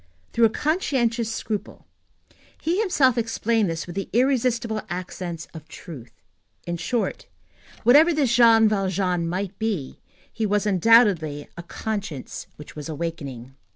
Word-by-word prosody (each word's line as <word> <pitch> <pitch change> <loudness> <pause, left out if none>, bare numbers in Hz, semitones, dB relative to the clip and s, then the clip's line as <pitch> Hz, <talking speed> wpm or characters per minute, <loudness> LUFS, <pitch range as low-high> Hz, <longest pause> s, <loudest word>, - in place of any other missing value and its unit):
Through 235 - +4
a - - +5
conscientious 240 - 0
scruple. 215 -2 -5 0.7
He 340 +5 0
himself 270 - +3
explained 225 -2 0
this 165 -1 -3
with 175 - -9
the 195 - -4
irresistible 240 -3 +1
accents 175 -1 -5
of 160 -2 -10
truth. 125 -8 -11 0.4
In 175 0 -3
short, 220 +8 -2 0.6
whatever 290 +9 +6
this 285 -7 +1
Jean 230 -2 +6
Valjean 190 -4 0
might 190 +2 -4
be, 205 -12 -3 0.3
he 220 -2 -1
was, 205 +1 +1
undoubtedly, 190 -7 +3
a 170 - -7
conscience 195 - -5
which 150 - -12
was 150 +1 -7
awakening. 140 -6 -5
205 Hz, 130 wpm, -24 LUFS, 170-235 Hz, 0.7 s, whatever